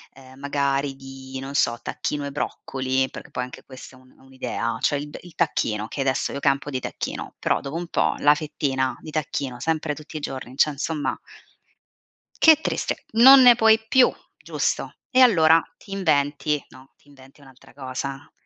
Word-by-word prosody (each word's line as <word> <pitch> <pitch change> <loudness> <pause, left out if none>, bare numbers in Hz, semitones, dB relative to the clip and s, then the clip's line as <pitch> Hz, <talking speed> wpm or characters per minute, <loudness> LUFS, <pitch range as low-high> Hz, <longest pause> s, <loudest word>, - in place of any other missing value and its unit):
ehm, 130 0 -16
magari 140 -1 -1
di, 135 0 -10
non 135 +1 -7
so, 120 -4 +1
tacchino 145 -1 -4
e 140 - -5
broccoli, 130 -1 -2
perché - - -10
poi 125 - -3
anche 125 - -10
questa 130 0 -13
è - - -18
un 130 0 -22
è - - -26
un'idea, 130 -3 -4
cioè, 145 - +2
il 145 +1 -7
il 175 -2 -15
tacchino, 105 -1 -1
che 140 - -5
adesso 130 -1 0
io 140 - -4
campo 140 +1 0
di 130 - -2
tacchino, - - -6
però - - 0
dopo 140 +3 -7
un 170 0 -4
po' - - 0
la 145 +1 +5
fettina 135 -4 -2
di 155 - -10
tacchino, 140 -4 -3
sempre 160 0 -1
tutti 155 +1 -9
i - - -4
giorni, 130 -2 -7
cioè, 150 - +4
insomma, 150 +1 -3 1.2
che 315 -1 +6
triste! - - -2
Non 260 +4 +9
ne 245 -1 +8
puoi 225 -1 +5
più, 255 +2 +5 0.3
giusto? - - -2 0.2
E 255 - +4
allora 165 -10 +6 0.2
ti - - -16
inventi, 150 -5 0
no, 130 +1 -17
ti - - -30
inventi 135 0 -18
un'altra 135 -2 -18
cosa. 135 +1 -6
140 Hz, 180 wpm, -23 LUFS, 130-155 Hz, 1.2 s, Non